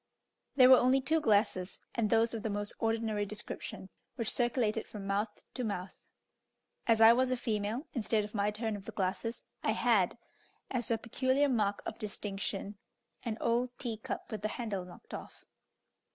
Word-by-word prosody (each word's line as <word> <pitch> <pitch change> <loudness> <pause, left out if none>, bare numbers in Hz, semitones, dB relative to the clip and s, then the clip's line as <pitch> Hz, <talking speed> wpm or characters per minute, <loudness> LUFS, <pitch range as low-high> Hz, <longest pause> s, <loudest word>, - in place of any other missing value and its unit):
There 255 -1 +8
were 260 - +11
only 255 +2 +4
two 310 +5 +1
glasses, 205 -5 +2
and 220 -3 +1
those 225 +1 +3
of 225 - -3
the 220 - -2
most 205 0 -2
ordinary 225 -2 0
description, 205 -2 -6 0.3
which 230 -2 0
circulated 235 -3 +1
from 205 -2 -7
mouth 205 +2 -2
to 255 - -3
mouth; 195 -4 -3 0.9
as 225 -2 +4
I 225 +1 +9
was 255 +1 +2
a 255 - +1
female, 220 +3 -2
instead 220 -3 +1
of 210 - -8
my 205 -1 +1
turn 215 +1 -2
of 200 -1 -8
the - - -5
glasses, 195 +4 -2 0.2
I - - +1
had, - - +3 0.5
as 245 -3 -1
a 230 - +2
peculiar 260 +5 +1
mark 210 -5 +1
of - - -5
distinction, 205 -1 -4 0.4
an 225 -3 -3
old 245 +1 0
tea 230 -4 -3
cup 220 - -6
with 215 -3 -4
the 215 - 0
handle 215 -5 -3
knocked 180 - -13
off. - - -8
220 Hz, 175 wpm, -32 LUFS, 205-240 Hz, 0.9 s, were